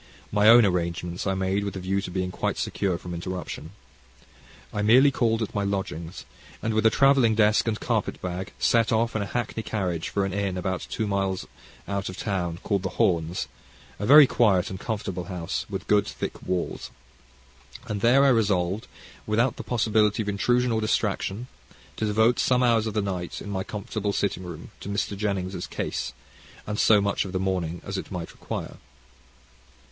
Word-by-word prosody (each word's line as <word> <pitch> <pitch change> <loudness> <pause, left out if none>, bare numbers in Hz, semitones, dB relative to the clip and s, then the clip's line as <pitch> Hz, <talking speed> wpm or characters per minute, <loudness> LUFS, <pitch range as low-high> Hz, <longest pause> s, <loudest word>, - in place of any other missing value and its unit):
My 105 +1 +5
own 120 -1 +9
arrangements 85 0 -2
I 95 - +1
made 95 +2 0
with 100 -1 -4
a - - -4
view 95 +2 -1
to 95 - -6
being 90 0 -2
quite - - -2
secure 95 -4 -1
from 90 0 -8
interruption. 85 -2 -5 1.0
I 105 - -1
merely 125 +7 +6
called 115 -3 +1
at 110 - -5
my 100 - 0
lodgings, 90 -4 -4 0.3
and 110 - -2
with 110 +1 +4
a - - +7
travelling 130 -2 +4
desk 105 +1 +3
and 110 -1 0
carpet - - -1
bag, 90 +2 -4
set 115 -2 +3
off 115 +1 +1
in 110 - 0
a 100 - -3
hackney 120 -1 -3
carriage 90 -7 -2
for 100 -1 0
an 95 - -3
inn 100 -2 -1
about 95 0 -3
two 110 - -2
miles 95 -2 -1 0.4
out 100 -1 -2
of 95 - -8
town, 90 -5 -2
called 100 -3 0
"The 95 - -5
Horns," 85 -1 +1 0.5
a 105 - -2
very 145 +1 +10
quiet 100 -7 +2
and 95 - -6
comfortable 95 -5 -4
house, 90 -3 -4
with - - -5
good 105 0 +3
thick - - -5
walls. 90 -1 -3 1.0
And 105 -4 -4
there 130 +5 +5
I - - +6
resolved, 100 -4 +1 0.4
without 115 +4 +1
the - - -5
possibility 110 -2 +2
of 105 - -3
intrusion 120 +5 +1
or 110 -1 +1
distraction, 110 0 -1 0.5
to 110 - -1
devote 110 +3 +3
some 125 0 +3
hours 115 -2 +3
of 110 - -4
the 105 - +1
night, 90 -3 -4
in 100 - -7
my 95 -1 -2
comfortable 105 0 -3
sitting 100 -3 -1
room, 85 +1 -8
to - - -7
Mr. 100 0 -1
Jennings' 100 -2 -2
case, - - -3 0.5
and 105 0 -3
so 105 -2 +5
much 100 0 0
of 95 - -7
the 95 - 0
morning 90 -3 -2
as 95 0 -3
it - - -8
might 90 -3 -5
require. - - -6
100 Hz, 185 wpm, -26 LUFS, 95-110 Hz, 1.0 s, very